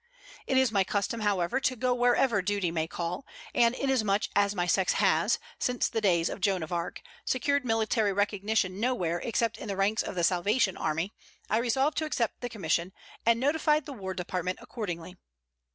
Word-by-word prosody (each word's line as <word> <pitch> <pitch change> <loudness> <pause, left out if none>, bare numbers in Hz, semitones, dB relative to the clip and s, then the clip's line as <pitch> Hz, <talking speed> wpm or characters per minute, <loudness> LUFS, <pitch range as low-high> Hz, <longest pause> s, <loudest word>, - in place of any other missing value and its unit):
It 265 - +2
is 260 -3 +4
my 200 -3 +3
custom, 205 +4 -1
however, 205 +2 +1
to 260 -1 0
go 250 +1 +1
wherever 245 -3 +3
duty 200 -2 0
may 160 -1 -1
call, 170 +7 -4 0.3
and 235 0 +4
inasmuch 220 -8 +1
as 205 0 +3
my 175 -2 0
sex 185 +1 +2
has, - - +3 0.2
since 250 -1 +1
the 225 - -2
days 175 -5 +3
of - - -5
Joan 185 -2 +1
of 160 - -6
Arc, 170 0 -3 0.2
secured 280 +2 +1
military 225 -2 +1
recognition 200 -1 0
nowhere 185 -9 0
except 230 0 -1
in - - -7
the 200 - -2
ranks 200 +3 +2
of - - -5
the 175 - 0
Salvation 190 +4 +2
Army, 165 +6 -2 0.4
I 220 - +3
resolved 265 +6 +1
to 315 - -1
accept 240 -7 -2
the 245 - -3
commission, 180 -4 -1 0.3
and 230 0 +5
notified 300 +2 +2
the 285 - -7
War 190 -5 -5
Department 180 0 -3
accordingly. 180 -5 -6
205 Hz, 185 wpm, -29 LUFS, 185-245 Hz, 0.4 s, and